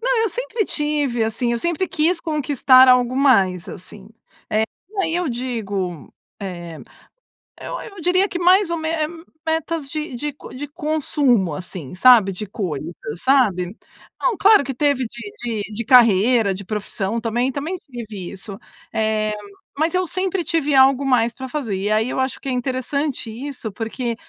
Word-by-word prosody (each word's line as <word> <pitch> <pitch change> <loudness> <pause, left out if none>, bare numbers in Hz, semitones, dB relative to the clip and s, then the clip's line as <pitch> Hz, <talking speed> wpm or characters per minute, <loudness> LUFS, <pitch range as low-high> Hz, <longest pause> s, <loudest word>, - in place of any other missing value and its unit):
Não, - - +2
eu 450 - +2
sempre 480 0 -2
tive 290 -6 0
assim. 230 +2 -1
Eu 235 - 0
sempre 345 +6 -1
quis 330 +2 +1
conquistar 275 -4 +4
algo 250 0 +4
mais, 195 -10 +3
assim, 195 +2 -10 0.9
é - - +2
aí 325 -1 -1
eu 350 -3 0
digo 205 - -4 0.3
eh, 175 -4 -6 0.8
eu - - -5
eu 400 -3 -10
diria 365 +3 +2
que 350 - -4
mais 365 +1 +4
ou 340 - 0
me 315 0 -2 0.6
metas 320 -2 -1
de 305 -1 -4
de 295 +5 -3
con - - -12
de 280 +3 -6
consumo, 285 - +1
assim 180 -3 -7
sabe 225 -1 +6
de 200 +3 -6
coisas, 175 - -4 0.3
sabe. 210 -9 +2 0.5
Não, 470 - +1
claro 420 -4 +6
que 270 0 -4
teve 280 -1 +1
de 225 -1 -5
de 215 - -10
de 230 +3 -4
carreira, 225 -2 +5
de 200 - -7
profissão, 210 +1 -3
também 240 +3 0
também 300 +7 -3
tive 215 -7 -7
isso. 195 0 -8 0.4
Eh, 215 -1 0 0.4
mas 315 +3 +1
eu 365 0 +1
sempre 370 +1 -1
tive 320 -4 0
algo 270 +1 +5
mais 240 -3 +3
para 260 -1 -7
fazer. 250 -8 -3
E 195 +2 -2
aí 220 +3 +1
eu - - -1
acho 260 0 -1
que - - -7
é - - 0
interessante 255 +1 -2
isso, 240 -2 -6
porque 230 +2 -3
255 Hz, 165 wpm, -21 LUFS, 215-300 Hz, 0.9 s, sabe